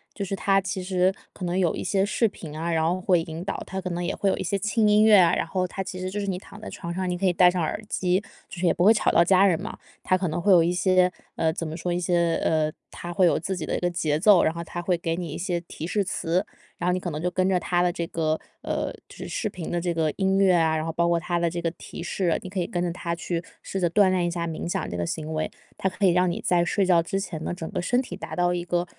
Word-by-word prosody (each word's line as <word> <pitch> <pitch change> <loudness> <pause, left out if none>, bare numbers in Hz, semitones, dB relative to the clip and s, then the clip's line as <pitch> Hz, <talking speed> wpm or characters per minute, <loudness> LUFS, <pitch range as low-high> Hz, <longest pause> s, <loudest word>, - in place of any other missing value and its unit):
就 200 - -3
是 195 0 -3
它 195 0 +2
其 195 -1 -4
实 185 0 +2 0.2
可 185 - -9
能 175 +1 -1
有 180 -4 +2
一 - - -4
些 195 -1 +1
视 225 +3 +2
频 160 -7 -9
啊， 165 +2 -2
然 160 -1 +2
后 180 +2 0
会 180 -3 +3
引 165 +1 -6
导。 195 - -4
它 190 0 -5
可 185 - -4
能 175 0 -3
也 175 - -1
会 200 - +1
有 - - 0
一 - - -3
些 200 -1 -1
轻 210 +2 +2
音 210 +1 +5
乐 215 -1 +7
啊， 175 -2 +5
然 - - 0
后 185 +2 -1
它 190 +2 -5
其 185 -1 -6
实 185 - -3
就 205 - -3
是 200 - -3
你 185 -2 -1
躺 200 +2 -12
在 - - -7
床 170 -2 -6
上， 185 0 -2
你 180 - -1
可 195 - -1
以 180 - +3
戴 180 +1 +6
上 180 - -1
耳 165 +6 -2
机， 180 0 +1 0.3
就 175 - -9
是 180 - +1
也 - - +5
不 175 - +2
会 220 - +8
吵 - - +1
到 170 - +5
家 190 +2 +5
人 170 -4 +2
嘛。 - - -6 0.3
它 185 - +2
可 185 0 -1
能 160 +2 -2
会 195 +4 +2
有 175 -3 +7
一 170 - +1
些， 185 0 +3 0.2
呃， 160 - +1
怎 165 +1 -4
么 155 - -5
说？ 175 +1 -3
一 175 - 0
些 170 -1 +1
呃， 155 -1 +2 0.2
它 175 - -7
会 180 +2 +3
有 170 - +3
自 190 +3 -3
己 165 - -4
的 - - -2
一 - - -1
个 175 - 0
节 155 -3 0
奏， 200 0 +6
然 160 - +2
后 170 0 -5
它 175 - -6
会 180 +1 +2
给 165 -1 -2
你 175 -1 -4
一 145 - -5
些 175 -1 -2
提 165 -1 -7
示 205 +2 +1
词。 180 0 -1 0.3
然 175 - -2
后 180 - +3
你 185 - 0
可 180 - -4
能 150 -2 -4
就 180 +2 -1
跟 185 0 +1
着 185 - +2
它 175 0 0
的 180 - +2
这 170 -1 -3
个 160 -1 -1 0.2
呃， - - -2 0.2
就 - - -13
是 - - -6
视 215 - -2
频 180 -4 -6
的 175 -1 -1
这 175 -1 -1
个 160 -2 +1
音 195 0 +2
乐 195 -2 +5
啊， 160 -2 +2
然 155 - -2
后 165 - -2
包 170 +1 +1
括 170 0 +2
它 175 0 -1
的 170 0 +1
这 175 - -4
个 165 -1 -1
提 165 - -9
示， 175 -1 0
你 185 - -7
可 190 - -2
以 175 - -1
跟 175 -1 -2
着 175 - -1
它 170 -1 -3
去 170 0 -3 0.2
试 195 - -4
着 175 - +3
锻 190 +2 +4
炼 180 -2 +1
一 - - 0
下 170 0 -2
冥 165 0 -4
想 - - -2
这 - - -5
个 85 -1 -2
行 155 - -4
为。 155 0 -1 0.3
它 190 - -1
可 185 +2 -1
以 185 - +6
让 180 +1 +3
你 170 - -3
在 175 -1 +2
睡 195 +3 +1
觉 175 -2 +4
之 195 +4 -2
前 160 -5 -5
呢， - - -3
整 165 -3 -6
个 185 -3 -2
身 245 +7 +1
体 260 - -4
达 - - -7
到 175 0 +2
一 175 -1 -2
个 175 0 0
175 Hz, 340 characters per minute, -25 LUFS, 170-190 Hz, 0.3 s, 会